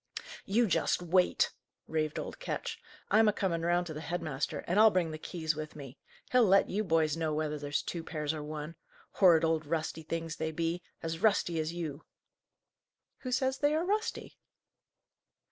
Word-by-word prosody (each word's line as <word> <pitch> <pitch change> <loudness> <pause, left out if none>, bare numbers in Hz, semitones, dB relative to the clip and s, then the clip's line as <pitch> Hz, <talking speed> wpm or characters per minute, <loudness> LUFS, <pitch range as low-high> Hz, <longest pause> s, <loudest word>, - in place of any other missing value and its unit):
"You 230 +5 +3
just 180 -2 +1
wait!" 180 +1 +3 0.4
raved 155 -1 -1
old - - -5
Ketch. - - -4 0.3
"I'm 220 +2 +6
a - - +6
coming 185 -5 -1
round 175 +1 +2
to 160 - -6
the 155 - -6
head 175 +2 -2
master, 150 -3 -3
and 180 +4 +1
I'll 220 0 +9
bring 180 -5 0
the 155 - -6
keys 160 -2 -2
with 155 0 -6
me. 135 -4 -10 0.3
He'll 250 -1 +6
let 195 +1 +4
you 210 +3 0
boys 160 -5 +2
know 160 -2 -1
whether 150 -1 -2
there's 145 0 -1
two 170 -2 -4
pairs, 155 -2 -2
or 155 - -5
one. 150 +1 -6 0.4
Horrid 170 -4 +5
old 160 -1 +1
rusty 160 0 -2
things 165 0 -4
they 160 0 -2
be; 165 +2 -1 0.2
as 165 0 -3
rusty 185 -5 +2
as 155 +1 -1
you!" 160 -4 -5 1.2
"Who 255 - -5
says 260 +1 +1
they 295 +1 +3
are 325 +2 0
rusty?" 430 +4 -2
165 Hz, 180 wpm, -31 LUFS, 155-190 Hz, 1.2 s, I'll